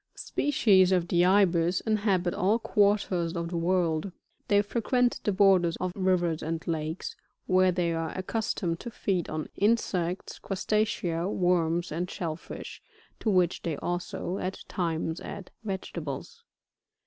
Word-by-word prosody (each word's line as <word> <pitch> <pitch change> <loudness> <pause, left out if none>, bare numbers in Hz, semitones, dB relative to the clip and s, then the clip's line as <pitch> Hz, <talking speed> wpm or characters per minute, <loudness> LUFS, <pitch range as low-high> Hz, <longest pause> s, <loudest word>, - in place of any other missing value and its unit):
48. - - -13
["Species 200 -10 +3
of 180 -2 +2
the 175 0 +4
Ibis 180 -2 +3
inhabit 200 -5 +1
all 200 +5 +2
quarters 200 -6 +1
of 170 0 -2
the 175 - -4
world. 170 0 +1 0.4
They 205 0 +4
frequent 240 +3 +1
the 210 - +1
borders 185 -3 +4
of 185 -1 -1
rivers 180 -4 +1
and 165 +2 -3
lakes, 160 0 -3 0.3
where 185 0 +4
they 175 -2 0
are 165 -1 -2
accustomed 185 -3 -2
to 240 - -6
feed 190 -6 -1
on 155 0 -4
insects, 190 -5 0
Crustacea, 190 -4 -1
worms 175 -3 +1
and 175 +4 -2
shell 165 -3 -3
fish, 170 - -9 0.4
to 220 - 0
which 180 -3 +2
they 160 -4 -2
also, 175 +2 -3
at 185 +1 -4
times, 165 -2 -2
add 200 -2 -8
vegetables. 170 -8 -5
180 Hz, 140 wpm, -28 LUFS, 170-200 Hz, 0.4 s, the